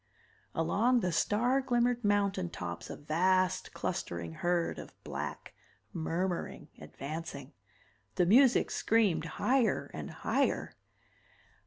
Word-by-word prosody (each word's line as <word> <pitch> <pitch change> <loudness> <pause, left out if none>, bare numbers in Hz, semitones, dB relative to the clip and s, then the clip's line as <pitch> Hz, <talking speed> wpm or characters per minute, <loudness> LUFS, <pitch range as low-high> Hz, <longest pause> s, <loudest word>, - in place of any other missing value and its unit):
Along 225 +10 +2
the 180 - 0
star 240 +10 +2
glimmered 245 -1 +1
mountain 200 -3 +1
tops 85 - -6
a - - -5
vast 185 +4 +1
clustering 85 -1 -4
herd 175 - 0
of - - -10
black, - - -5 0.4
murmuring, 175 +2 -2
advancing. 145 -1 -7 0.6
The 180 - +3
music 245 +7 +5
screamed 200 -8 +2
higher 255 -2 +2
and - - -6
higher. - - 0
185 Hz, 105 wpm, -31 LUFS, 165-230 Hz, 0.6 s, music